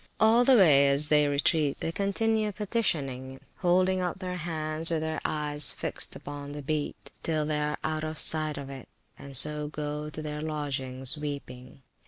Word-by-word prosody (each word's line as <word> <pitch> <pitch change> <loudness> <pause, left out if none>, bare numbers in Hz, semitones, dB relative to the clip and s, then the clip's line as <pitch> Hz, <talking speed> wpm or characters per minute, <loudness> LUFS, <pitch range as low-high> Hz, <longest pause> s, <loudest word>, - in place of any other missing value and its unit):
All 225 +2 +5
the 260 +1 +6
way 145 -8 +6
as 140 +2 +1
they 150 -1 +5
retreat 145 +1 +1
they 165 - -2
continue 215 +3 0
petitioning, 145 - -1 0.2
holding 185 +1 +2
up 180 0 -2
their 180 -1 -5
hands, 155 -1 +2
with 165 -2 0
their 160 0 -3
eyes 150 -1 +1
fixed - - -4
upon 145 0 -8
the 145 -1 -7
Beat, 150 +1 -3
till 155 -2 0
they 150 0 -1
are 150 0 -1
out 155 0 -2
of 155 0 -4
sight 155 -1 +1
of 140 -1 -7
it; 135 -3 -10 0.3
and 140 -2 -2
so 150 +2 +1
go 150 0 -4
to 155 - -6
their 150 0 -4
lodgings 140 -3 -3
weeping. 135 -3 -7
150 Hz, 175 wpm, -28 LUFS, 145-165 Hz, 0.3 s, the